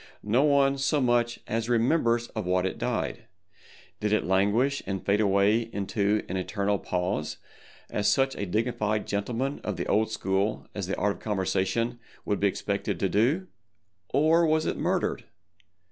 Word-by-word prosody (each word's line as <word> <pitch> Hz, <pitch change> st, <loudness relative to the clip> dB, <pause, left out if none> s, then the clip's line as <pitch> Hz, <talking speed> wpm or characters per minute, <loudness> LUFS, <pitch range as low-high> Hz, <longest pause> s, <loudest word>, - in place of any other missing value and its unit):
No 110 Hz, +5 st, +2 dB
one 140 Hz, -2 st, +3 dB
so 145 Hz, +2 st, +1 dB
much 120 Hz, -2 st, +1 dB
as 115 Hz, +1 st, -2 dB
remembers 120 Hz, -1 st, +2 dB
of 110 Hz, -5 st, -5 dB
what 90 Hz, 0 st, +2 dB
it 95 Hz, -, -3 dB
died. -, -, -2 dB, 0.7 s
Did 105 Hz, -1 st, -1 dB
it 105 Hz, -, +2 dB
languish 105 Hz, +9 st, +2 dB
and 95 Hz, -1 st, -3 dB
fade 100 Hz, +2 st, +2 dB
away 105 Hz, +3 st, +3 dB
into 100 Hz, +1 st, 0 dB
an 95 Hz, -, -3 dB
Eternal 100 Hz, +1 st, -1 dB
Pause 90 Hz, -3 st, -2 dB, 0.5 s
as 105 Hz, 0 st, 0 dB
such 135 Hz, 0 st, +2 dB
a 100 Hz, -, -4 dB
dignified 110 Hz, +1 st, -1 dB
gentleman 120 Hz, +7 st, -2 dB
of 105 Hz, -3 st, -3 dB
the -, -, -2 dB
old 110 Hz, +2 st, +2 dB
school 100 Hz, -1 st, -1 dB
as 100 Hz, -4 st, -4 dB
the 95 Hz, -, -2 dB
Art 105 Hz, 0 st, 0 dB
of -, -, -20 dB
Conversation 105 Hz, +3 st, -1 dB, 0.3 s
would 100 Hz, -, 0 dB
be 100 Hz, -, +3 dB
expected 95 Hz, -, -2 dB
to -, -, +1 dB
do—or 115 Hz, -, 0 dB
was 155 Hz, 0 st, +2 dB
it -, -, -1 dB
murdered? -, -, -1 dB
105 Hz, 160 wpm, -27 LUFS, 100-120 Hz, 0.7 s, one